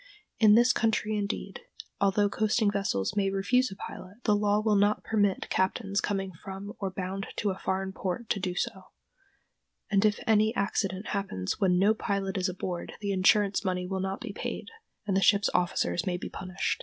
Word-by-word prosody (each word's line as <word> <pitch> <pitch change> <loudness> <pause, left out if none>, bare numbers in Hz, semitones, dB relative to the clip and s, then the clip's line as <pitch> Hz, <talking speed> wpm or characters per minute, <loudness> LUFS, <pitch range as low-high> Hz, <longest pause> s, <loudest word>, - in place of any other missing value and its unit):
In 215 -2 +7
this 240 +1 +5
country, 220 -1 +1
indeed, 205 - -3 0.4
although 200 +1 +3
coasting 215 +1 +1
vessels 195 - -1
may 200 -1 +2
refuse 200 +7 +2
a 195 - -8
pilot, 195 +4 -9
the 210 - +3
law 205 0 +2
will 215 0 +1
not 205 +1 +2
permit 205 -3 +1
captains 195 +1 0
coming 195 -1 -2
from 195 +4 -8
or 195 - -2
bound 190 +1 -4
to 205 - 0
a 190 - -6
foreign 190 0 -2
port 190 +5 -3
to 200 - +1
do 180 -1 -2
so; 190 +1 -3 1.1
and 195 -1 +3
if 210 -1 +3
any 220 +1 +3
accident 195 0 -1
happens 190 - -2
when 180 -2 +3
no 200 +4 +4
pilot 200 -2 -2
is 185 -1 0
aboard 180 -1 -5
the 200 -1 -2
insurance 200 +2 +3
money 180 -2 -1
will 190 +1 -3
not 190 +1 -3
be 220 -4 -6
paid, - - -5 0.4
and 200 -3 0
the 195 - +3
ship's 200 0 +4
officers 175 0 0
may 180 -1 0
be - - -6
punished. 185 0 -3
195 Hz, 185 wpm, -28 LUFS, 190-210 Hz, 1.1 s, In